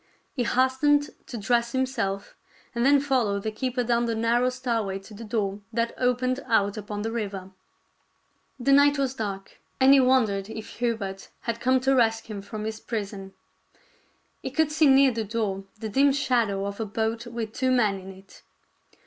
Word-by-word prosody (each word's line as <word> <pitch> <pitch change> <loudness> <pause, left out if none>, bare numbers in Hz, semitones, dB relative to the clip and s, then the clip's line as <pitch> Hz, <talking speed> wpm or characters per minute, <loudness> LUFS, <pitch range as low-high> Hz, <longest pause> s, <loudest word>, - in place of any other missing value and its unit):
He 245 -4 -1
hastened 265 +4 +2 0.2
to 240 - -6
dress 235 +3 +1
himself, 230 -7 -2 0.4
and 235 0 -1
then 280 +2 +5
followed 245 -8 0
the 220 - -2
keeper 250 +2 -2
down 235 0 +1
the 230 -1 -1
narrow 235 +3 +2
stairway 230 -6 -2
to 195 +2 -13
the 215 +3 -9
door 205 -2 -2
that 230 0 -1
opened 255 +1 0
out 205 -4 +2
upon 210 -1 -5
the 225 - -2
river. 200 -4 -4 1.1
The 275 +3 +1
night 285 +1 +6
was 270 -2 0
dark; 200 -5 -6 0.2
and 265 +1 +7
he 280 - +7
won 255 -1 +5
dered 200 -1 -4
if 220 -1 -7
Hubert 220 -5 -3
had 230 -1 -3
come 260 +2 +3
to 265 +1 +2
rescue 225 -3 +1
him - - -6
from 210 +2 -7
his 220 0 -4
prison. 200 -4 -5 1.1
He - - -4
could 315 -2 +1
see 305 0 +4
near 270 0 +6
the 230 -1 -2
door 205 -3 -2
the 220 - -5
dim 275 +6 +3
shadow 235 -8 +1
of 200 +1 -5
a 225 - -1
boat 225 +3 -2
with 230 -2 -5
two 260 0 0
men 215 -6 +2
in 190 +1 -10
it. 190 +1 -16
230 Hz, 185 wpm, -26 LUFS, 205-255 Hz, 1.1 s, and